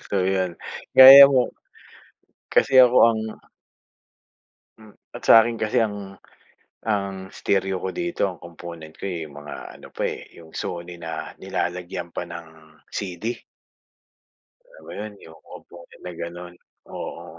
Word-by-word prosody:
So 95 -2 0
'yun, 95 -2 -1 0.4
gaya 135 +1 +12
mo 130 -3 +1 1.0
kasi 135 - +3
ako 125 0 +5
ang 110 -1 -1 1.6
Hmm, 110 -2 -17 0.2
at - - -9
sa 115 - +8
akin 115 0 -3
kasi 110 -1 -1
ang 100 -2 -6 0.7
ang 100 -3 -3
stereo 95 -1 -1
ko 95 - -3
dito 175 -9 -2
ang 90 -3 -4
komponent 85 -2 -11
ko, - - -7
eh, 85 -5 -4
mga 75 0 -10 0.2
ano - - -14
pa, - - -3
eh, - - -8
'yung 80 -1 -15
Sony 85 0 -6
na 80 -1 -6
nilalagyan 90 0 -4
pa - - -3
ng 85 -1 -9 0.4
CD. 90 -1 -6 1.5
Alam - - -18
mo - - -10
'yun 105 0 -7
'yung 80 0 -15
komponent 85 -1 -15
na 90 - -5
gano'n, 85 +1 -8 0.4
oo. 85 - -7
95 Hz, 140 wpm, -23 LUFS, 85-105 Hz, 1.6 s, gaya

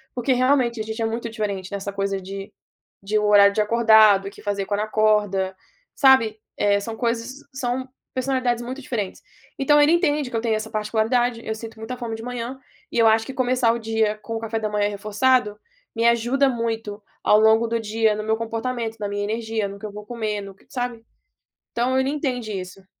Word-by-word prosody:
porque 250 +2 +1
realmente 250 -2 +2
a - - -2
gente 220 +1 -6
é - - +1
muito 230 +1 -3
diferente 200 -4 -4
nessa 200 0 -4
coisa 195 0 -1
de 195 +2 -8 0.5
de 210 +2 +1
o 210 - 0
horário 200 -1 +6
de 215 - +2
acordado, 215 -3 +5
o - - -6
que - - -15
fazer 200 -2 -2
quando 205 +1 -1
acorda, 210 -3 +1 0.4
sabe, 230 -6 +4 0.2
eh, 200 0 +3
são 225 +2 -5
coisas 235 +1 -2 0.2
são 255 0 -2 0.3
personalidades 255 -2 0
muito 260 +3 -6
diferentes. 215 -7 -4 0.4
Então 295 +2 +4
ele 295 +2 +5
entende 295 -5 +1
que - - -4
eu 225 - 0
tenho 225 -2 +1
essa 220 +1 -4
particularidade, 230 +2 0
eu 220 - -2
sinto 225 0 -9
muita 220 +3 -6
fome 230 -2 -4
de 225 - -8
manhã, 245 +1 -5 0.3
e - - -3
eu 230 - +5
acho 220 0 +5
que 265 - -7
começar 250 -2 +2
o - - -2
dia 220 -1 0
com 225 - -5
o - - -2
café 225 0 -3
da 215 -1 -2
manhã 205 0 +1
reforçado, 210 +2 +1 0.4
me 230 +1 0
ajuda 240 +4 +3
muito 225 -3 -3 0.2
ao 210 - +5
longo 220 +1 +4
do 230 0 -1
dia 220 0 +1
no 215 - -4
meu 220 +1 +1
comportamento, 230 0 -3
na 205 - -2
minha 205 0 -3
energia, 220 -1 -2
no 200 0 -8
que 215 - -9
eu 210 - -6
vou 210 0 -9
comer, 215 -3 -3
no 195 -1 -10
que - - -26
sabe? 245 -3 -4 0.7
Então, 250 +2 0
ele 265 +1 +1
entende 255 -7 -2
isso. 185 +1 -10
225 Hz, 210 wpm, -23 LUFS, 210-245 Hz, 0.7 s, horário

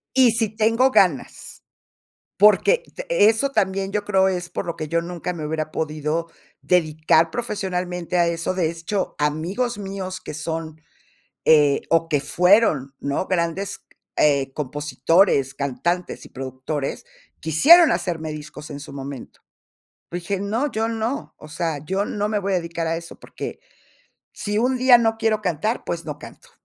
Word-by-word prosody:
Y 255 -3 +6
si 225 -1 +1
tengo 225 +4 +2
ganas, 180 - 0 0.7
porque 210 - +5
de - - -6 0.2
eso 225 +5 +1
también 195 -5 0
yo 210 0 -1
creo 190 -2 +3
es 180 -2 -2
por - - -4
lo 170 - -4
que 155 - -5
yo 170 +2 +1
nunca 175 +1 -4
me 165 -3 -6
hubiera 155 0 -3
podido 155 +1 -2 0.3
dedicar 160 -1 +2
profesionalmente 180 -6 -3
a 170 - +4
eso. 170 +2 -2
De 175 -4 +1
hecho, 170 +4 -3
amigos 170 +12 -1
míos 190 -2 -5
que - - -8
son, 160 0 -5 0.7
eh, 150 -3 +5
o 165 0 +2
que 145 - +2
fueron, 175 - +3
¿no?, 140 +6 -2
grandes, 185 +2 -2 0.3
eh, 140 -2 +3
compositores, 150 +1 +1
cantantes 140 +7 -2
y - - -13
productores, 135 +2 -5 0.3
quisieron 305 - +6
hacerme 160 -3 -2
discos 150 0 -9
en 145 -1 -7
su 145 0 -10
momento. 140 -2 -8 0.7
Dije: 180 +3 -3
"No, 225 +8 -1
yo 220 +1 0
no, 230 +4 -3
o 155 - -13
sea, 165 -1 -2
yo 190 +4 -1
no 210 0 -2
me 215 - +1
voy 200 0 -2
a - - +3
dedicar 170 -1 -3
a 165 0 0
eso, 165 0 -9
porque - - -7 0.7
si 210 0 -2
un 255 +3 +2
día 255 -1 +7
no 225 -1 +1
quiero 220 -1 +1
cantar, 185 +5 -1
pues - - -4
no - - -6
canto". 485 - -13
175 Hz, 160 wpm, -22 LUFS, 155-210 Hz, 0.7 s, día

